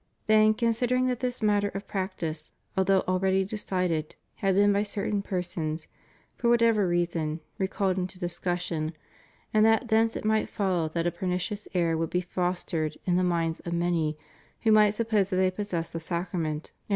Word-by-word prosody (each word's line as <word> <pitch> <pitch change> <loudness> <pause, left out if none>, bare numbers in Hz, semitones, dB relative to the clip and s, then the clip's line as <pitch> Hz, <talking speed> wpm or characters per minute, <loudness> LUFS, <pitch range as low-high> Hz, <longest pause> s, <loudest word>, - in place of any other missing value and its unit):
Then, 215 0 +5
considering 245 +2 +1
that 250 -2 -1
this 250 -2 -3
matter 205 -1 +3
of 200 +1 -5
practice, 180 -5 -4 0.2
although 190 0 +3
already 190 +1 +1
decided, 180 -6 -2 0.2
had 195 -1 +1
been 205 +1 +5
by 200 - +2
certain 205 0 -1
persons, 170 -5 -3 0.5
for 235 - 0
whatever 230 -4 +4
reason, 170 -3 0 0.2
re 190 - +1
called 190 -1 0
into 185 0 -3
discussion, 175 -2 -2 0.6
and 215 0 +5
that 225 +2 +3
thence 225 +1 +3
it - - -5
might 215 0 +2
follow 180 -5 0
that 165 +1 -2
a 175 - +2
pernicious 185 +3 -3
error 165 -2 +2
would 165 0 -1
be 180 - 0
fostered 175 -3 -2
in 180 - +2
the 185 - +3
minds 165 -2 0
of 170 - -5
many 170 -3 0 0.4
who 220 - +3
might 210 -1 +5
suppose 215 -4 +1
that 190 - -1
they 185 0 +3
possessed 185 -4 -3
the 165 - -3
Sacrament 170 +2 -3 0.2
and 155 - -1
ANGLICAN 150 - -10
ORDERS. - - -41
185 Hz, 180 wpm, -27 LUFS, 170-210 Hz, 0.6 s, Then